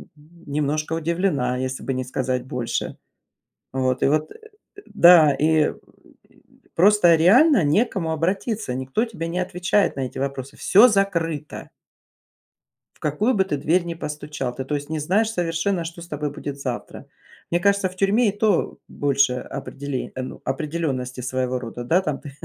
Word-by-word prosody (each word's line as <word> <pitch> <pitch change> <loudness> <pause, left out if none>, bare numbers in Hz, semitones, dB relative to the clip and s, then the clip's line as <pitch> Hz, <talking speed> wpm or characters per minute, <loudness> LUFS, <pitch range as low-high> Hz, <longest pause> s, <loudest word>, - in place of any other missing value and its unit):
немножко 150 -1 -4
удивлена, 165 -6 0
если 130 0 -4
бы 135 - -2
не 130 0 -3
сказать 125 0 -2
больше". 125 -2 -3 0.7
Вот 130 -1 0
и - - +4
вот 155 +2 0 0.5
Да, 170 -4 +6
и 155 +1 +2 1.0
просто 180 -2 +5
реально 225 - +5
не 155 +11 +3
к - - -15
кому 165 -5 -2
обратиться, 185 - -2
никто 130 - -1
тебе 195 -8 -6
не 175 +2 -2
отвечает 180 +2 0
на 135 - -3
эти 130 - -5
вопросы. 135 0 -4
Всё 210 +6 +6
закрыто 170 -7 -1 1.3
в - - -28
какую 205 - 0
бы 195 -3 +2
ты 170 -6 -2
дверь 165 +6 +1
ни 170 -1 -4
постучал, 150 -5 -5
ты, 130 - -5
то 150 - -3
есть, 145 +1 -4
не 160 - -2
знаешь 195 +9 +1
совершенно, 175 -1 -1
что 170 +1 -8
с 170 - -11
тобой 150 -1 -3
будет 145 -1 -7
завтра. 125 -3 -6 0.4
Мне 175 - +2
кажется, 200 0 +2
в 185 - -15
тюрьме 205 +5 +2
и 205 +1 -3
то 215 -1 +1
больше 140 -2 +1
определе 135 +1 -6
ну, 130 0 -6
определенности, 135 -3 -3
своего 130 0 -2
рода, 120 0 -7
да. 165 +10 +2
Там 150 -7 -3
ты 145 - -9
155 Hz, 160 wpm, -22 LUFS, 135-180 Hz, 1.3 s, Да